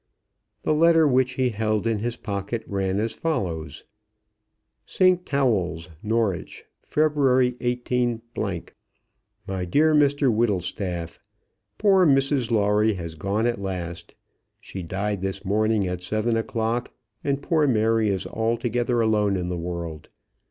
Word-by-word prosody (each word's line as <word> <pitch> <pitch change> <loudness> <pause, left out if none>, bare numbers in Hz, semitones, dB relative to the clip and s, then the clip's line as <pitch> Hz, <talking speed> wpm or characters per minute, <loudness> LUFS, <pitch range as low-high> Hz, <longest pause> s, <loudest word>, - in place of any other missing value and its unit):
The - - +2
letter 165 0 +5
which 130 -1 +2
he 130 -1 +1
held 110 -1 -1
in 115 -2 +1
his 120 +2 -3
pocket 105 +1 -4
ran 95 0 -1
as 110 +1 -1
follows: 85 - -3 1.0
ST. 185 - +2
TAWELL'S, 95 - 0
NORWICH, 110 -4 -2 0.2
February 135 -5 +2
18. 120 -1 -1
MY 95 0 -7
DEAR 155 - +3
MR 145 -3 +3
WHITTLESTAFF, 90 -5 -2 0.6
Poor 190 -4 +4
Mrs 135 -3 +2
Lawrie 105 -1 +2
has 85 -3 -6
gone 100 +7 -1
at 120 -4 -1
last. 90 -3 -5 0.4
She 95 - -8
died 100 +3 -3
this 95 +1 -4
morning 110 +1 +1
at 90 -1 -3
seven 110 +5 0
o'clock, 115 +1 -1 0.3
and 140 0 -1
poor 155 -3 +2
Mary 110 -2 +2
is 95 -2 -1
altogether 120 +1 0
alone 105 -3 +2
in 90 -1 -3
the 90 - -2
world. 85 -3 -5
110 Hz, 125 wpm, -24 LUFS, 95-125 Hz, 1.0 s, letter